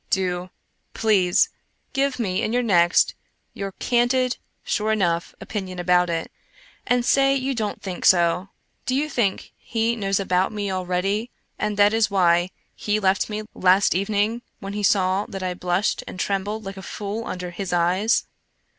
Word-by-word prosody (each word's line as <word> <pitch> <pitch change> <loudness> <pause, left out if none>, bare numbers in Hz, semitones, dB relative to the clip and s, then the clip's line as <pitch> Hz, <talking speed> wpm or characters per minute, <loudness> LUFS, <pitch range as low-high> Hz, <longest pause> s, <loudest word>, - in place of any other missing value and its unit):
Do, 180 -1 -1 0.5
please, 190 -5 +3 0.4
give 275 -1 +1
me 195 -5 -1
in 220 - -1
your 245 0 +2
next 175 -6 +4 0.4
your 195 -1 -5
candid, 245 +2 +1 0.3
sure 215 +1 0
enough 175 -5 0
opinion 190 -4 -5
about 180 0 +3
it, 165 -1 -3 0.6
and 245 -1 +2
say 275 +1 +4
you 270 0 -1
don't 215 -4 -3
think 185 -2 -5
so. 175 +1 +4 0.4
Do 255 - +1
you 290 +3 +1
think 235 -9 -1
He 230 0 -1
knows 195 -3 0
about 185 -1 +1
me 205 -2 -3
already 190 +5 -1 0.3
and 210 -1 -1
that 205 +1 +5
is 225 -1 +3
why 175 -2 +3 0.2
He 210 0 -1
left 190 0 +1
me 215 0 -3
last 190 +2 +4
evening 205 +4 0 0.2
when 195 0 -6
He 210 - -3
saw 190 0 +2
that 195 -2 -6
I 180 -1 -1
blushed 180 +2 -1
and 185 - -8
trembled 205 +3 -2
like 195 0 -6
a - - -7
fool 210 +3 -5
under 180 -1 -5
His 190 +1 -5
eyes? 180 +6 +2
195 Hz, 165 wpm, -23 LUFS, 185-220 Hz, 0.6 s, that